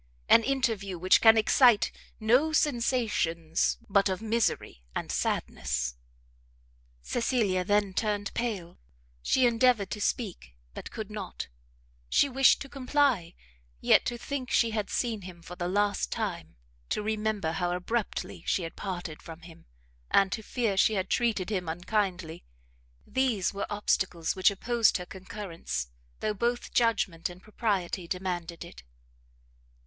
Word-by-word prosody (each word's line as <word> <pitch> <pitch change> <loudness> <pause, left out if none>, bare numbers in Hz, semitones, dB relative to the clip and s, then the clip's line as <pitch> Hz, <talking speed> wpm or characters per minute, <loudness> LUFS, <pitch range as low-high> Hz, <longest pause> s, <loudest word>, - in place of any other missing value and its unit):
an 230 - +7
interview 225 -9 -1
which 185 +2 +4
can 225 0 +8
excite 230 0 +5 0.3
no 250 +8 +3
sensations 230 - +1
but 200 -1 +3
of 185 - -2
misery 225 - -1
and - - -3
sadness?" 60 -1 -1 1.1
Cecilia 220 - +1
then 205 0 +1
turned 205 -1 -1
pale, 205 - -3 0.4
she 255 - +3
endeavoured 235 -4 +3
to 210 - -4
speak, 185 - -3 0.2
but - - -8
could 220 -2 -7
not; 200 - -6 0.6
she - - +4
wished 270 0 +4
to - - -11
comply, 260 - +1 0.4
yet - - +5
to 240 - -2
think 255 0 -4
she 230 - +3
had 210 -2 -2
seen 230 -4 -1
him 175 -2 -11
for 180 - -9
the 175 -1 -3
last 205 +2 0
time, 185 - -4 0.3
to 210 - -1
remember 215 -5 -1
how 175 +2 -1
abruptly 200 +5 -3
she 185 - +1
had 165 - -6
parted 175 -5 -5
from 165 0 -10
him, 165 - -15 0.4
and 195 -1 +4
to 220 - -2
fear 220 -2 -1
she 215 +3 +4
had 190 -1 -2
treated 220 -5 +1
him 180 -5 -2
unkindly; 180 -1 -2 0.6
these 245 -9 0
were 200 - -3
obstacles 190 -5 0
which 185 +1 +5
opposed 230 +3 +2
her 180 - -7
concurrence, 175 - -6 0.3
though 215 - 0
both 240 +4 -2
judgment 200 -9 +1
and 180 +1 -12
propriety 195 -5 -2
demanded 175 -2 -4
it. - - -12
205 Hz, 140 wpm, -29 LUFS, 180-230 Hz, 1.1 s, can